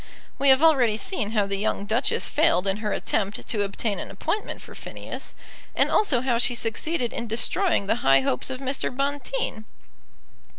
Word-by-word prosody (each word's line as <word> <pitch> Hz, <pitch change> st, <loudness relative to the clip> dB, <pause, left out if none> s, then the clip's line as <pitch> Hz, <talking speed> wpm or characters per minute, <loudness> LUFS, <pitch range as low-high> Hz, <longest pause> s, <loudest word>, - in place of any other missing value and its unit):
We 280 Hz, -, +4 dB
have 265 Hz, +3 st, +6 dB
already 255 Hz, -9 st, +4 dB
seen 225 Hz, -, -3 dB
how 210 Hz, -3 st, +2 dB
the 200 Hz, 0 st, -1 dB
young 205 Hz, -1 st, -1 dB
Duchess 225 Hz, +4 st, 0 dB
failed 310 Hz, -, +2 dB
in 195 Hz, 0 st, 0 dB
her 210 Hz, -1 st, -3 dB
attempt 205 Hz, -1 st, -2 dB
to 210 Hz, -, 0 dB
obtain 200 Hz, +1 st, -2 dB
an -, -, -6 dB
appointment 425 Hz, -, -3 dB
for -, -, -12 dB
Phineas, -, -, -8 dB, 0.4 s
and -, -, +3 dB
also 280 Hz, -, +3 dB
how 245 Hz, -2 st, +1 dB
she 245 Hz, 0 st, +2 dB
succeeded 240 Hz, +3 st, 0 dB
in 235 Hz, -, -4 dB
destroying 240 Hz, -, +1 dB
the 210 Hz, -, +1 dB
high 135 Hz, 0 st, +5 dB
hopes 125 Hz, -, 0 dB
of 260 Hz, -1 st, -4 dB
Mr. 270 Hz, 0 st, -2 dB
Bonteen. 280 Hz, -, -3 dB
235 Hz, 175 wpm, -25 LUFS, 210-280 Hz, 0.4 s, have